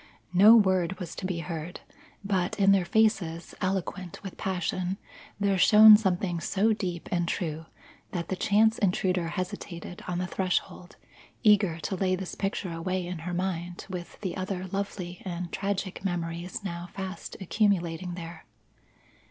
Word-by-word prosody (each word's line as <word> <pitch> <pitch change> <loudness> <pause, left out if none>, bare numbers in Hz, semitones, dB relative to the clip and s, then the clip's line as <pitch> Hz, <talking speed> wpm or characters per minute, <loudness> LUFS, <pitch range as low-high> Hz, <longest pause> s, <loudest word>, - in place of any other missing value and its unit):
No 205 +5 +8
word 190 -4 +3
was 170 -2 -6
to 185 - -4
be 175 -3 -2
heard, 165 +1 -6 0.4
but 190 -2 0
in 195 0 +6
their 195 -2 +4
faces, 175 -6 +1
eloquent 185 -1 -3
with 195 - -7
passion, 185 0 -2 0.4
there 200 -2 +2
shone 215 +2 +9
something 185 -4 0
so 210 +6 +2
deep 180 -5 -4
and 175 -1 +1
true 160 -3 -3 0.4
that 170 -2 -4
the 190 - 0
chance 215 +4 +3
intruder 180 -2 +1
hesitated 180 -1 -5
on 180 -1 -2
the 180 - -1
threshold, 180 -1 -2 0.5
eager 205 -6 +4
to 155 +5 -2
lay 185 0 +1
this 185 -1 -6
picture 195 -2 -2
away 185 +2 -2
in 175 -1 -5
her - - -3
mind 175 -1 -3
with 175 -2 -7
the 190 -4 -3
other 185 -1 -3
lovely 190 -3 -4
and 175 -2 -5
tragic 195 -1 -3
memories 175 +1 -3
now 175 -2 -5
fast 190 0 -6
accumulating 180 -3 0
there. 170 -1 -8
185 Hz, 150 wpm, -28 LUFS, 175-195 Hz, 0.5 s, shone